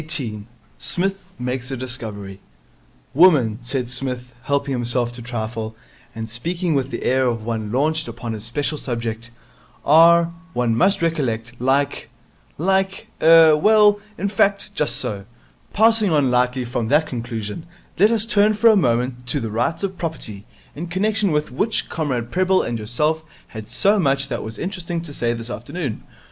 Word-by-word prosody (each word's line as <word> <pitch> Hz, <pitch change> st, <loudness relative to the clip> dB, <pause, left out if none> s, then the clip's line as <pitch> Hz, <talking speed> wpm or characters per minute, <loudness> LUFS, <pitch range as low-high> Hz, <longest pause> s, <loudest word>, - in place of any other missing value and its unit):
Psmith 195 Hz, +2 st, -1 dB
Makes 125 Hz, 0 st, -3 dB
a 135 Hz, -, -3 dB
Discovery 110 Hz, -6 st, -5 dB, 0.7 s
'Women,' 140 Hz, -10 st, +5 dB
said 125 Hz, +1 st, -1 dB
Psmith, 125 Hz, 0 st, -4 dB
helping 140 Hz, 0 st, 0 dB
himself 120 Hz, -1 st, +1 dB
to 120 Hz, -, -9 dB
trifle, 110 Hz, -2 st, -5 dB, 0.4 s
and 110 Hz, 0 st, -5 dB
speaking 170 Hz, -, -2 dB
with 135 Hz, -2 st, 0 dB
the -, -, -5 dB
air 130 Hz, 0 st, +2 dB
of 115 Hz, -3 st, -2 dB
one 110 Hz, -2 st, -3 dB
launched 155 Hz, +5 st, 0 dB
upon 115 Hz, 0 st, -6 dB
his 105 Hz, -1 st, -6 dB
special 145 Hz, +6 st, -2 dB
subject, 115 Hz, -2 st, -4 dB, 0.6 s
'are, 170 Hz, +2 st, +6 dB, 0.2 s
one 120 Hz, -2 st, +1 dB
must 190 Hz, -, +2 dB
recollect, 120 Hz, -9 st, -1 dB
like 135 Hz, +2 st, 0 dB, 0.5 s
like 190 Hz, +3 st, 0 dB
er, 160 Hz, -1 st, +7 dB
well, 210 Hz, +4 st, +5 dB, 0.2 s
in 200 Hz, -, -1 dB
fact, 200 Hz, 0 st, +1 dB
just 150 Hz, -, 0 dB
so. 100 Hz, -2 st, -3 dB, 0.5 s
Passing 220 Hz, -1 st, +4 dB
on 145 Hz, -6 st, +2 dB
lightly 125 Hz, +1 st, +1 dB
from 120 Hz, -1 st, -2 dB
that 150 Hz, +5 st, +3 dB
conclusion, 115 Hz, +2 st, -5 dB, 0.3 s
let 205 Hz, +3 st, +6 dB
us 225 Hz, -2 st, +1 dB
turn 215 Hz, -1 st, +3 dB
for 225 Hz, +2 st, +6 dB
a -, -, +4 dB
moment 125 Hz, -, 0 dB
to 135 Hz, +4 st, -1 dB
the 115 Hz, -4 st, -4 dB
Rights 120 Hz, -, -1 dB
of 190 Hz, -2 st, -3 dB
Property, 115 Hz, -, -6 dB, 0.3 s
in 165 Hz, +5 st, -5 dB
connection 200 Hz, +2 st, 0 dB
with 150 Hz, -2 st, -1 dB
which 210 Hz, -, -1 dB
Comrade 125 Hz, -7 st, -2 dB
Prebble 185 Hz, +1 st, +2 dB
and 115 Hz, -, -3 dB
yourself 150 Hz, +9 st, -1 dB, 0.3 s
had 110 Hz, -1 st, -9 dB
so 200 Hz, -, +2 dB
much 135 Hz, -4 st, +1 dB
that 120 Hz, -, -3 dB
was 110 Hz, 0 st, -7 dB
interesting 175 Hz, -2 st, -4 dB
to 160 Hz, -4 st, -9 dB
say 120 Hz, -4 st, -1 dB
this 115 Hz, +1 st, -7 dB
afternoon. 125 Hz, +1 st, -5 dB
135 Hz, 160 wpm, -21 LUFS, 120-170 Hz, 0.7 s, er